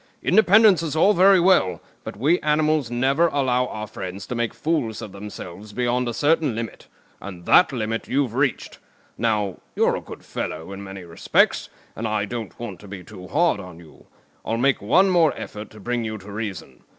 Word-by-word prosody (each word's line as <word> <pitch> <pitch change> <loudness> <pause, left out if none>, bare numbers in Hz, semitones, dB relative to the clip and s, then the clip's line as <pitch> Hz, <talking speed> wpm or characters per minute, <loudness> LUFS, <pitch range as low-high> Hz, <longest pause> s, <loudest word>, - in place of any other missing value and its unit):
Independence 205 -1 +5
is 160 -2 -3
all 195 +6 +5
very 190 0 +6
well, 175 - +3 0.2
but - - -7
we 150 +10 +2
animals 150 -3 +1
never 135 +7 +2
allow 130 -4 +1
our 110 -2 -5
friends 95 -2 -7
to - - -5
make 120 -1 -1
fools 140 -9 -2
of 105 - -7
themselves 100 0 -9
beyond 125 +1 0
a - - -3
certain 150 -4 +2
limit; 115 -2 -6 0.3
and 90 -3 -9
that 180 - +6
limit 115 -3 -3
you've 135 -3 0
reached. 135 0 -1 0.4
Now, 105 -4 0 0.2
you're - - +2
a - - -4
good - - -11
fellow 80 +4 -5
in 100 0 -7
many 95 -1 -8
respects, 85 -1 +1 0.3
and 110 - -3
I 105 -1 0
don't 115 -1 -7
want 115 -6 -6
to 105 - -13
be 95 -2 -8
too 95 -1 -11
hard 165 - +2
on 90 -3 -10
you. 85 -3 -17 0.4
I'll 115 - -2
make 135 +2 +2
one 185 - +4
more 165 -4 +3
effort 105 +1 -7
to 110 - -14
bring 120 +2 -2
you 110 -1 -4
to 100 +1 -11
reason. 105 -2 -6
115 Hz, 190 wpm, -23 LUFS, 100-150 Hz, 0.4 s, very